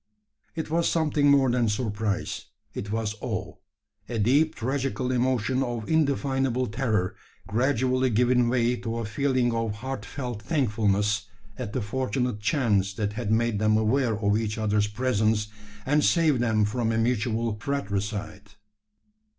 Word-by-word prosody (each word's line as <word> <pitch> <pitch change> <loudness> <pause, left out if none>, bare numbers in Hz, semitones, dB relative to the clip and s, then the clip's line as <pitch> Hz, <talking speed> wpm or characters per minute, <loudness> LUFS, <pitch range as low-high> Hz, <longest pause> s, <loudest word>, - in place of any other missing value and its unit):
It 160 -2 -4
was 170 +1 +2
something 150 -3 +2
more 135 -3 +5
than 120 -2 +2
surprise 105 -2 -2 0.3
it 100 - -5
was 110 -1 -1
awe - - -3 0.6
a 120 - -2
deep 140 +9 +3
tragical 130 +1 -2
emotion 130 0 +1
of 120 -4 -3
indefinable 135 -4 +1
terror, 110 -5 -1 0.3
gradually 130 +4 +1
giving 125 +1 +3
way 120 0 +2
to 115 -1 -4
a 115 - -3
feeling 125 +2 +1
of 115 -2 -1
heartfelt 125 -1 -5
thankfulness, 105 -7 +1 0.3
at 110 -2 -6
the 130 - -1
fortunate 125 0 -1
chance 105 - +1
that 105 0 -2
had 110 -1 -3
made 115 -1 +1
them 110 0 +3
aware 110 +1 +1
of 100 -1 +1
each 110 -1 -3
other's 105 -1 +1
presence, 110 -2 0 0.4
and 150 +2 +2
saved 160 -6 +3
them 110 -3 +2
from 115 +2 -1
a 110 - 0
mutual 115 -1 0
fratricide. 105 -4 -3
115 Hz, 140 wpm, -26 LUFS, 105-130 Hz, 0.6 s, more